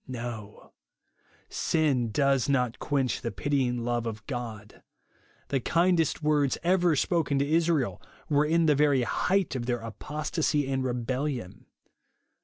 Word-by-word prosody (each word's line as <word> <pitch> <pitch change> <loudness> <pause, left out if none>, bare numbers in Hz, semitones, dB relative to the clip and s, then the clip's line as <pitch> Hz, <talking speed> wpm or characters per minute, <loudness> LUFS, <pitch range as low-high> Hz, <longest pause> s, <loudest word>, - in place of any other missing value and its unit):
No; 115 -5 -7 0.7
sin 140 -7 +1
does 140 +1 +2
not 125 -4 +1
quench 135 -3 -1
the 115 - -2
pitying 125 -4 -1
love 120 -1 -1
of 110 -1 -6
God. 115 -5 -6 0.7
The 135 - +1
kindest 165 +2 +1
words 150 -3 +2
ever 175 -2 +3
spoken 155 -1 +1
to 140 +1 +1
Israel 155 - +1 0.3
were 145 -1 +3
in 165 +1 +3
the 150 - +5
very 145 -3 +3
height 185 +7 0
of 120 -2 -3
their 120 -2 -1
apostasy 150 - -2
and 135 -1 -1
rebellion. 125 -2 -3
135 Hz, 130 wpm, -28 LUFS, 120-150 Hz, 0.7 s, the